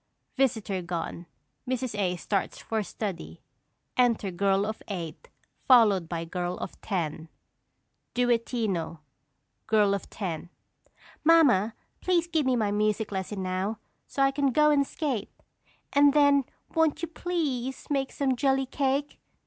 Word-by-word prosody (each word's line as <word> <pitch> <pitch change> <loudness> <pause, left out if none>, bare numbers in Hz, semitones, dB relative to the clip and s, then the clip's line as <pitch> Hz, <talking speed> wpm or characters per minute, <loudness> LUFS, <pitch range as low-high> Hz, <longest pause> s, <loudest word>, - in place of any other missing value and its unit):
[Visitor 220 -8 0
gone; 170 0 -5 0.4
Mrs. 255 -2 -1
A. 185 -3 0
starts 195 +3 -2
for 220 -1 -2
study. 200 -3 -6 0.5
Enter 235 -6 +2
Girl 195 +2 +2
of 215 +1 -4
Eight 170 -6 -6 0.4
followed 210 -9 +5
by 165 -1 -3
Girl 175 +1 -3
of - - -7
Ten.] 165 -5 -3 0.9
Duettino. 230 -9 0 0.7
Girl 210 -2 +4
of 200 - -4
Ten. 175 -5 -5 0.7
Mamma, 275 - +5 0.2
please 350 -2 +2
give 320 -5 0
me 255 - +3
my 215 -4 +1
music 210 +1 0
lesson 190 0 -3
now, 185 +4 -2 0.3
so 275 - 0
I 275 - +4
can 275 -1 +1
go 300 +3 +4
and 280 -2 +3
skate; 265 - -2 0.6
and 285 0 +6
then 285 -2 +5 0.3
won't 320 -1 +2
you - - 0
please 295 -7 -3
make 270 -2 0
some 270 -2 0
jelly 270 +1 +2
cake? 275 +2 -1
225 Hz, 135 wpm, -28 LUFS, 190-275 Hz, 0.9 s, and